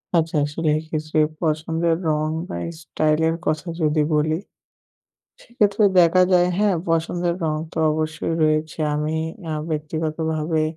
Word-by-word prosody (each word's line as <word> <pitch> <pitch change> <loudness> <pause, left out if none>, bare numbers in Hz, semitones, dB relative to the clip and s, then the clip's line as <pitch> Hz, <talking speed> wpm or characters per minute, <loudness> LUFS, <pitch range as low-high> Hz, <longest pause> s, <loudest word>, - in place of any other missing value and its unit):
আচ্ছা 165 -1 +1
আসলে 155 +2 -2
এই 155 - -3
ক্ষেত্রে 155 0 -1 0.2
পছন্দের 160 +1 0
রং 155 0 +1 0.2
বা - - -4 0.3
স্টাইল 155 -1 0
এর 165 - 0
কথা 155 +3 -1
যদি 155 0 +2
বলি। 155 +1 +2 1.1
সেক্ষেত্রে 215 -3 +1 0.2
দেখা 175 +2 +5
যায় 175 -1 +5
হ্যাঁ 205 -3 +3
পছন্দের 170 +1 0
রঙ 155 -1 0 0.2
তো - - -5
অবশ্যই 155 +1 -2
রয়েছে। 155 +1 +1 0.2
আমি 150 +1 -1 0.4
আ - - -1 0.2
ব্যক্তিগতভাবে 155 +1 -1
155 Hz, 135 wpm, -22 LUFS, 155-165 Hz, 1.1 s, দেখা